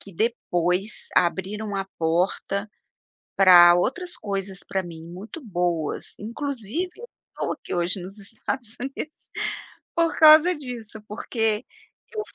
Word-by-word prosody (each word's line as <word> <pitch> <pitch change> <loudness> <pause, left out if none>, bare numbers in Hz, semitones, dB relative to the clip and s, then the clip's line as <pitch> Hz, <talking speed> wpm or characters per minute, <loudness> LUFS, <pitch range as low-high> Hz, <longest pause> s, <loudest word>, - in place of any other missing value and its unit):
que 200 - -13
depois 185 -2 0
abriram 200 +4 0
a 195 - -1
porta 185 +5 0 0.7
para 175 -3 +9
outras 305 - -1
coisas 195 -1 -4
para 190 -1 -1
mim 165 -2 -9
muito 190 - -9
boas, 175 -6 -2
inclusive 270 - -3
eu 480 +1 -10 0.2
estou - - -3
aqui - - -6
hoje, 175 +2 0
nos 195 +4 -8
Estados 225 +3 -4
Unidos, 275 +4 -6 0.7
por 335 -1 +2
causa 310 +3 +8
disso, 240 -7 -7
porque 220 +1 -1 0.5
eu 430 - -2
205 Hz, 120 wpm, -24 LUFS, 180-250 Hz, 0.7 s, para